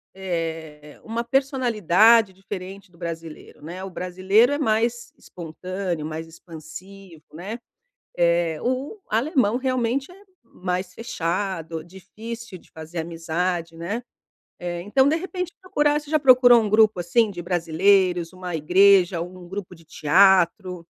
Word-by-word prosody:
eh, 165 -5 -5
uma 230 +1 -3
personalidade 230 - +3
diferente 195 0 -9
do 170 - -22
brasileiro, 165 -3 -8
né? 175 +4 -7
O 195 - -6
brasileiro 190 +8 +2
é - - 0
mais 235 -2 0
espontâneo, 175 0 -6
mais 160 +1 -5
expansivo, 165 +2 -12
né? 195 +9 -7 0.6
Eh, 170 -2 +1
o 260 - -2
alemão, 245 - +1
realmente, 260 +2 -1
é - - -15 0.3
mais 180 -4 -4
fechado, 170 -6 -3
difícil 210 +4 -9
de - - -23
fazer 160 +2 -8
amizade, 165 +1 -3
né? 190 +9 -4 0.6
Eh, 175 -1 -4
então 265 +8 +3
de 315 - +2
repente 360 0 -5
procurar 295 -6 +1
você 295 0 -14
já 310 - +3
procurou 245 -4 +6
grupo 215 -3 +4
assim 205 +6 +2
de 175 -2 -7
brasileiros, 175 +1 +2
uma 185 -2 -7
igreja, 180 +2 +4
algum 180 +1 -8
grupo 190 -1 -7
de 165 - -19
teatro? 180 +2 +3
185 Hz, 130 wpm, -23 LUFS, 170-230 Hz, 0.6 s, procurou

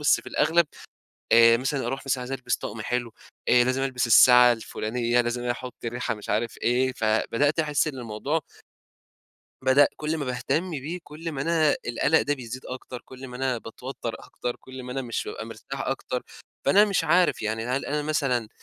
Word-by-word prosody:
بس 150 - +4
في - - -23
الأغلب، 170 -1 +3 0.7
آآ 115 0 +7
مثلًا 135 +2 -2
أروح 135 - -3
مثلًا 130 -1 0
عايز 125 +2 -6
ألبس 125 -3 -1
طقم 110 +1 -6
حلو، 120 0 -2 0.4
آآ، 125 0 +6
لازم 130 +2 0
ألبس 130 -3 0
الساعة 125 +1 +8
الفلانيّة، 120 +2 -1
لازم 120 +1 -3
أحطّ 125 +1 -3
ريحة 120 +1 -2
مش 105 - -11
عارف 115 +2 -1
إيه، 130 +2 +2
فبدأت 115 +7 +1
أحسّ 150 0 +1
إنّ 135 -3 -4
الموضوع 120 +8 -2 1.2
بدأ 130 +2 +5
كُل 155 +1 -2
ما 145 - -2
باهتمّ 155 +8 -1
بيه، 155 +4 -4
كُل 160 +2 -7
ما 135 -1 -3
أنا 160 -2 +3
القلق 140 +6 +2
ده 145 - 0
بيزيد 130 0 -8
أكتر، 125 -1 -7
كُل 130 0 -10
ما 125 - -8
أنا 130 -2 -1
باتوتّر 115 +1 -7
أكتر، 120 0 -5
كُل 130 0 -10
ما 125 0 -6
أنا 135 0 -2
مش 115 -2 -3
بابقى - - -6
مرتاح - - -8
أكتر. - - -3 0.4
فأنا 205 +2 +6
مش 195 -5 0
عارف، 175 -5 +3
يعني 110 +2 -2
هل 130 +2 -1
أنا 150 +1 -1
مثلًا 135 -7 0
130 Hz, 185 wpm, -26 LUFS, 120-145 Hz, 1.2 s, الساعة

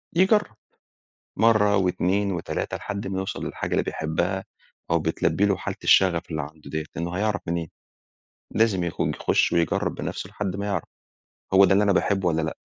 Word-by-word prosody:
يجرب، 190 - +3 0.8
مرة 105 -2 +4
و2 95 +2 +1
و3 85 -2 -3
لحد 100 -1 -5
ما 95 0 -2
يوصل 95 - -4
للحاجة - - -4
اللي - - +2
بيحبها، 80 +5 -2 0.5
أو 85 - +3
بتلبي 80 +5 +1
له 100 -2 +2
حالة - - -5
الشغف 90 -3 +5
اللي 80 - -1
عنده 75 0 -10
دِيَّة، 80 +1 -3
لأنه 85 +1 -3
هيعرف 105 0 0
منين؟ 85 -2 -2 0.9
لازم 105 -5 +2
يخو 85 - -1
يخش - - +1
ويجرب 85 -1 +1
بنفسه - - -5
لحد 100 -3 -3
ما 100 - -3
يعرف، 100 -5 -2 0.7
هو 95 - +8
ده 95 - +4
اللي 100 +2 +4
أنا 100 - +3
باحبه 95 -1 +1
والّا 80 -1 0
لأ. 80 - -3
95 Hz, 170 wpm, -25 LUFS, 85-100 Hz, 0.9 s, هو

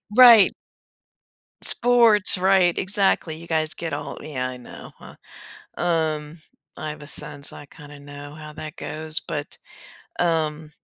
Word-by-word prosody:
Right. 235 -5 +8 1.1
Sports, 230 -6 +4
right. 185 -1 +3
Exactly. 190 -4 +1
You 170 +1 -12
guys 155 -1 0
get 165 -1 -5
all, - - -5
yeah, 130 -4 -4
I 130 - -8
know, 125 - -12
huh, - - -14 0.6
um, 160 -2 -1 0.4
I 155 - -6
have 150 0 -9
a - - -10
son, 145 -1 -4
so 145 - -6
I 145 - -11
kinda 145 0 -14
know 145 +1 -11
how 155 -1 -10
that 155 0 -8
goes, 155 +2 -3
but, 145 -1 -6 0.6
um, 155 -2 -1
155 Hz, 145 wpm, -23 LUFS, 150-175 Hz, 1.1 s, Right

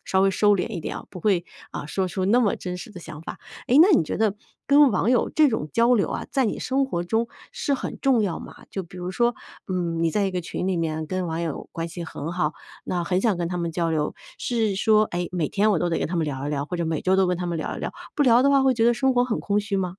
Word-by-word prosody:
稍 190 - +2
微 195 - +4
收 205 +2 +3
敛 180 - -2
一 195 -7 -5
点 - - -5
啊， - - -8
不 180 - -9
会， 185 -4 +2 0.3
啊， - - -5
说 185 +5 -1
出 185 +1 -2
那 235 +6 +4
么 210 -5 +2
真 180 -1 -5
实 220 - -9
的 185 - -10
想 160 -2 -9
法。 - - -8 0.3
哎， 250 - +1
那 370 - +6
你 - - +4
觉 155 - -3
得 215 -2 +1 0.3
跟 285 -1 +6
网 210 +4 +1
友 250 - +3
这 310 -1 +4
种 155 -10 -2
交 235 +2 +4
流 210 - +2
啊， - - -3
在 265 -4 +2
你 - - -2
生 270 +1 0
活 175 -9 -2
中 225 +5 0 0.2
是 475 -13 -1
很 - - -5
重 260 -5 +3
要 195 -5 -1
吗？ - - -12
就 195 - -3
比 180 +1 -13
如 180 0 -4
说， 240 +4 +1 0.3
嗯， 170 -3 -1
你 165 - +2
在 205 +1 +1
一 195 - 0
个 180 -1 -2
群 175 - -4
里 185 -3 0
面 160 -1 -2
跟 185 +1 -2
网 165 +1 -3
友 160 -4 -4
关 165 0 -3
系 170 +1 -7
很 165 0 -5
好， 155 -4 -1 0.3
那 175 -1 -2
很 180 +1 +1
想 215 -4 +2
跟 170 -1 -2
他 180 +1 -3
们 170 -1 -2
交 165 0 -1
流。 150 -2 -1 0.2
是 225 -5 0
说， 215 +2 +4
哎， 175 -3 -3
每 170 -4 -1
天 210 +2 +2
我 190 - +2
都 175 +1 0
得 - - 0
跟 - - -2
他 175 - -2
们 165 - +1
聊 140 -1 -4
一 - - -2
聊， 140 -1 -1
或 180 - -6
者 170 - -1
每 160 -2 -2
周 185 - +3
都 190 -1 +4
跟 180 - 0
他 180 - -4
们 170 -1 -2
聊 - - -4
一 - - -7
聊。 - - -4 0.2
不 295 - +2
聊 245 -2 +5
的 280 - +4
话 275 -1 +4
会 265 - +4
觉 230 -2 +2
得 240 - +4
生 265 +2 +2
活 245 - +3
很 245 -3 -1
空 205 0 0
虚 205 -1 -2
吗？ 185 -2 -1
185 Hz, 320 characters per minute, -24 LUFS, 170-230 Hz, 0.3 s, 那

